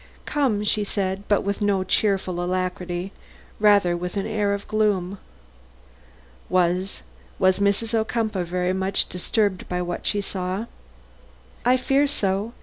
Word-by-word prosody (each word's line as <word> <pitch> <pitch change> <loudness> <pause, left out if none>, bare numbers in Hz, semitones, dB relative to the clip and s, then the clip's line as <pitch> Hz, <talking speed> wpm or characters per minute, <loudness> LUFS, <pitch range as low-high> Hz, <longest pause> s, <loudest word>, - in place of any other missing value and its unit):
"Come," 250 -9 +1
said 210 0 +1 0.3
she; - - -14
but 205 - +3
with 200 +1 -2
no 200 -2 +2
cheerful 185 -2 +1
alacrity, 180 0 -2 0.5
rather 205 -4 +5
with 180 +3 -4
an 195 - -1
air 210 -2 0
of 200 0 -3
gloom. 200 -3 0 1.3
"Was 185 +1 +1 0.3
was 185 0 +3
Mrs. 200 +3 +1
Ocumpaugh 220 -3 0
very 180 +1 0
much 190 +1 +1
disturbed 190 +1 0
by 180 - -1
what 175 0 -3
she 205 - +1
saw?" 190 +1 -3 1.0
"I 250 +1 +4
fear 275 +3 +2
so. 205 -4 -1
195 Hz, 135 wpm, -24 LUFS, 185-210 Hz, 1.3 s, rather